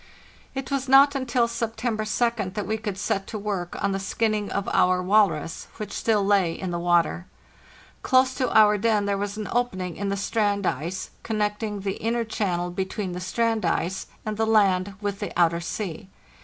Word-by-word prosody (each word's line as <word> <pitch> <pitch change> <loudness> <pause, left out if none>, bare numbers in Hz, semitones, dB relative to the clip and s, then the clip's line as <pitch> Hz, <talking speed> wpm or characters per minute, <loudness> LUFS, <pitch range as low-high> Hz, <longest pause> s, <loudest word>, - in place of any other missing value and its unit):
It 265 0 -4
was 270 -1 -1
not 275 +1 +7
until 255 -3 +1
September 230 -1 -2
2d 215 -4 0
that 210 -2 -2
we 220 +3 -2
could 205 -3 -4
set 195 0 -1
to 220 - -5
work 200 -4 -3
on - - +2
the 195 - -1
skinning 210 +1 -1
of 200 - -2
our 180 0 +3
walrus, 185 -5 +1
which 210 -1 -6
still 215 -3 +1
lay 195 -4 +3
in 185 0 -5
the 170 - -2
water. 170 - +1 0.7
Close 260 0 +3
to 255 -1 -1
our 210 -1 +6
den 215 -1 +2
there 200 0 +1
was 200 +1 -3
an 215 - -4
opening 185 -8 -1
in 200 0 -2
the 200 - -1
strand 205 -1 0
ice,* 175 +6 -3
connecting 210 -1 -2
the 195 0 -3
inner 230 +1 0
channel 180 -5 -2
between 190 +1 -3
the 180 - -5
strand 225 +4 0
ice 190 +3 -1 0.2
and 215 -1 -3
the 225 0 +1
land 200 -3 +3
with 200 -1 -3
the - - -4
outer 170 -1 +3
sea. 175 0 -5
205 Hz, 185 wpm, -25 LUFS, 185-225 Hz, 0.7 s, not